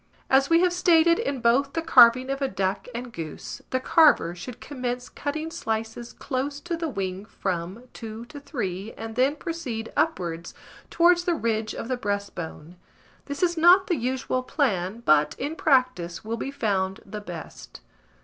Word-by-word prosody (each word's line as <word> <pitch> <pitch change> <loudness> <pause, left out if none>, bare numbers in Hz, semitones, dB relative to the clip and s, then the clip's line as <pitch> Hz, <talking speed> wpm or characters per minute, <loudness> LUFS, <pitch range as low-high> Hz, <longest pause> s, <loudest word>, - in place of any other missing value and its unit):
As 270 +1 +4
we 330 +1 +5
have 360 -1 +3
stated 340 -1 +4
in 275 -3 -2
both 265 +4 +3
the 330 - -1
carving 255 -4 +6
of 275 +1 -3
a 275 - +2
duck 195 -2 -2
and 240 0 -6
goose, 160 -6 -7
the 255 - 0
carver 285 - +4
should 225 +7 -9
commence 250 -3 -4
cutting 310 +3 -4
slices 225 -5 -4
close 280 +2 -3
to 345 +1 -3
the 330 -1 -3
wing 190 -5 -4
from, 190 +1 -4
2 225 0 -8
to 290 +4 -10
3, 210 - -4
and 225 0 -7
then 265 +4 +2
proceed 290 -10 -5
upwards 170 - -1 0.3
towards 345 +1 +4
the 350 -2 +2
ridge 220 -5 -1
of - - -5
the 255 0 -1
breastbone: 190 -6 -5 0.5
this 285 +3 -4
is 345 -1 +2
not 355 +4 +7
the 350 - 0
usual 255 0 -1
plan, 230 - -1
but, 150 -1 +4
in 290 +4 -3
practice, 255 - +1
will 225 +1 -2
be 250 - -4
found 200 -8 -1
the 210 +1 -7
best. 175 -5 -9
245 Hz, 170 wpm, -25 LUFS, 200-290 Hz, 0.5 s, not